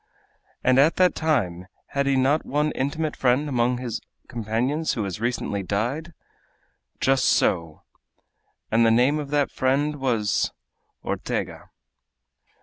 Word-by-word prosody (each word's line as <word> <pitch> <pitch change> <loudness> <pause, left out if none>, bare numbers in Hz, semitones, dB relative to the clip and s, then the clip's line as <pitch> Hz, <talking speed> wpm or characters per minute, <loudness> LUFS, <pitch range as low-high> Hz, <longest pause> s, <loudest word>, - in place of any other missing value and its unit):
"At 135 +5 +4
that 185 -1 +4
time 95 - -1 0.2
had 140 0 -1
he 140 - +3
not 135 +4 +2
one 150 +2 0
intimate 150 +3 -2
friend 130 +3 +2
among 125 -2 +1
his 120 -3 -4 0.3
companions 120 +7 -1
who 110 - -2
has 100 +1 -5
recently 115 -4 -1
died?" 120 - -2 0.9
"Just 135 0 +2
so!" 85 -3 +1 0.9
"And 115 +1 +4
the 115 - +5
name 125 +6 +3
of 145 -2 -5
that 145 -1 +1
friend 145 +3 0
was?" 120 -6 0 0.5
"Ortega." - - -4
130 Hz, 125 wpm, -24 LUFS, 115-145 Hz, 0.9 s, the